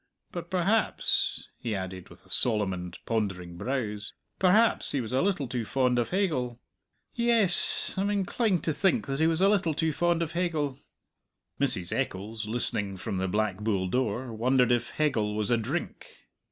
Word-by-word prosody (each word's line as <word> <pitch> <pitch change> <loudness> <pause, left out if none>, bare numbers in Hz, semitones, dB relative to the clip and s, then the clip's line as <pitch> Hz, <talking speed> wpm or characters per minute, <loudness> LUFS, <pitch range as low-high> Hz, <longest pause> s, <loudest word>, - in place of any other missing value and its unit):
But 175 -1 -6
perhaps," 190 +5 +1
he 115 -3 -3
added, 95 -1 -6
with - - -16
solemn 105 -5 +1
and 90 -1 -7
pondering 95 -6 -2
brows 105 -1 -3 0.3
"perhaps 210 +5 +4
he 140 - +1
was 120 0 -5
a 130 - +2
little 180 -8 0
too 120 -1 -3
fond 125 +1 +1
of 120 - -1
Hegel. 135 -11 -1 0.5
Yess, 230 -6 +4
I - - +1
am 200 - 0
inclined 200 -1 0
to 160 - 0
think 200 - +1
that 135 0 -3
he 160 - +4
was 165 +1 +1
a 195 - +6
little 195 -6 +2
too 160 0 0
fond 170 +2 +1
of 160 - -5
Hegel." 155 -6 -1 0.8
Mrs. 95 -11 0
Eccles, 105 +3 -3
listening 105 -4 +1
from 95 +1 -4
the 95 0 -1
Black 105 0 0
Bull 100 -3 -1
door, 120 +2 -2
wondered 125 +2 +2
if 120 -1 +1
Hegel 110 -9 0
was 105 +1 -1
a 120 - +4
drink. 110 - -4
125 Hz, 170 wpm, -28 LUFS, 105-170 Hz, 0.8 s, a